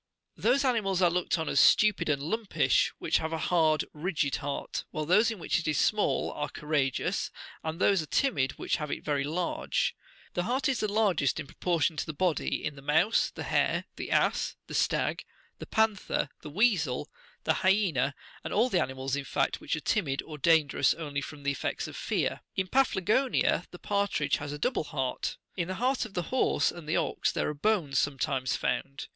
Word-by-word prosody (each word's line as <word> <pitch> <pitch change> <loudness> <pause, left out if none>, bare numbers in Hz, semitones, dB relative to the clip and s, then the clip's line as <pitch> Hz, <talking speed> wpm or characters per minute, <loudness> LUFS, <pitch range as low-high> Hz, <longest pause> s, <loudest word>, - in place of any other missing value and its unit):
Those 275 +1 +2
animals 210 -7 +1
are 175 - +5
looked 180 +1 0
upon 160 -2 -3
as 140 - +2
stupid 210 -6 +5
and 140 -2 0
lumpish 215 +6 +1
which - - +1
have 160 0 -3
a 165 - -1
hard, 160 -2 +2
rigid 155 -3 -1
heart, 140 0 -4
while 155 - -3
those 210 +8 +4
in 225 - -4
which 170 - 0
it 160 - -5
is 150 -2 +1
small 210 -1 +1
are 145 0 -3
courageous, 145 -3 -1 0.3
and 160 +1 -4
those 195 -2 +4
are 155 - -7
timid 140 - +1
which - - -1
have 150 -3 -4
it - - -4
very 145 -2 0
large. 180 - -1 0.4
The 175 - 0
heart 260 +5 0
is 265 -4 0
the 215 -1 -1
largest, 195 -11 +2
in 155 - -4
proportion 165 +1 0
to - - -1
the 155 - -5
body, 175 +1 0
in 150 - -3
the 140 - -11
mouse, 160 +10 +2
the - - -7
hare, - - +1
the - - -6
ass, - - +1
the - - -10
stag, - - 0 0.4
the - - -8
panther, 220 -3 +1
the 150 - -8
weasel, 160 - +1 0.4
the 160 - +1
hyaena, 175 -9 +2 0.3
and - - -5
all 230 +5 +3
the 185 -6 +2
animals, 130 +1 -2
in 140 - -3
fact, - - -1
which - - -1
are 160 - -5
timid, 150 -11 0
or 155 -2 -9
dan 160 0 +4
gerous - - +2
only 145 -3 -3
from 145 0 -9
the 140 - +1
effects 140 - -3
of - - -9
fear. - - -1
In 190 - 0
Paphlagonia 250 -5 +2
the 175 - -10
par 200 +2 0
tridge 150 -7 0
has 145 0 -6
a 145 - -4
double 155 - 0
heart. 135 -4 -3 0.2
In 170 -2 -2
the 185 - -3
heart 255 +4 0
of 215 - -11
the 175 - -3
horse 260 - +2
and 165 -3 -10
the 160 - +2
ox - - 0
there - - -1
are - - -2
bones 150 -5 +1
sometimes 135 -2 0
found. 140 0 -2
160 Hz, 205 wpm, -29 LUFS, 145-205 Hz, 0.4 s, are